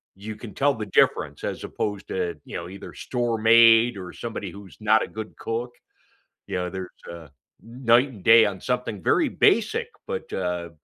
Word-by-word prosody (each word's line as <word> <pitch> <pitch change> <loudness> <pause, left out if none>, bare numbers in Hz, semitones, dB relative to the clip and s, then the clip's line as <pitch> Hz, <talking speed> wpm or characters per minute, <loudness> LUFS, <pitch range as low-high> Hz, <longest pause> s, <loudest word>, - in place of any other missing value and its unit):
you 105 +3 -7
can 105 -2 -10
tell 145 +1 +2
the 110 -4 -6
difference 95 - +1
as - - -4
opposed 105 -1 -4
to, 90 -2 -2
you - - -6
know, 85 - -6
either 95 +2 -10
store-made 115 -1 +4
or 90 -2 -7
somebody 110 -4 -6
who's 100 0 -13
not 110 +1 +3
a - - -5
good 110 0 -8
cook. 120 +2 -4 0.8
You - - -4
know, 90 0 -2
there's 95 -1 -6 0.2
a 85 -3 -10 0.3
night 120 +2 +2
and 110 -8 -13
day 115 0 +8
on 100 -2 -3
something 125 -6 -3
very - - +3
basic, - - +2 0.2
but, - - -5
uh, 90 -2 -3
110 Hz, 175 wpm, -24 LUFS, 95-115 Hz, 0.8 s, day